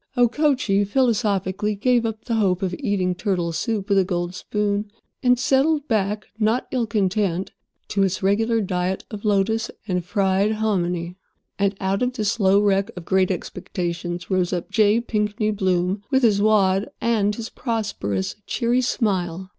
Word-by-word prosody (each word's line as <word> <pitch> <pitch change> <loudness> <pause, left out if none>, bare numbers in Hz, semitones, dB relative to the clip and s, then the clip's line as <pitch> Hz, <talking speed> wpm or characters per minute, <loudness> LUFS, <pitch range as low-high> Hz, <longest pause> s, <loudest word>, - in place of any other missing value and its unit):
Okochee 245 -5 +2
philosophically 210 -3 0
gave 240 +2 +2
up 220 -1 -6
the 235 - -2
hope 195 -4 +1
of 185 -1 -1
eating 200 -8 0
turtle 180 -3 -1
soup 205 +4 -2
with 200 -2 +3
a - - +4
gold 175 -1 -2
spoon, 205 +2 -2 0.3
and 250 -1 +4
settled 285 +4 +2
back, 210 -2 0
not 220 +3 +1
ill 245 -3 0
content, 195 -3 0 0.4
to 200 - 0
its 190 -1 0
regular 225 +4 +2
diet 185 -1 -2
of 210 -2 -7
lotus 215 +2 +1 0.2
and 180 -3 -1
fried 195 +2 +1
hominy. 180 -5 -1 0.4
And 200 0 +1
out 195 0 -1
of 250 0 0
this 215 -5 0
slow 200 -3 +3
wreck 200 -1 +2
of 175 - -7
great 190 0 +2
expectations 175 -1 -4
rose 185 -2 +1
up 175 -2 -3
J. 215 +1 +4
Pinkney 215 -1 -1
Bloom 190 -1 0
with 265 -2 +2
his 205 -4 +4
"wad" 200 -2 +3
and 210 -3 +1
his 230 +1 -6
prosperous, 205 - -3
cheery 240 +1 +1
smile. 190 -7 -1
205 Hz, 155 wpm, -22 LUFS, 185-225 Hz, 0.4 s, a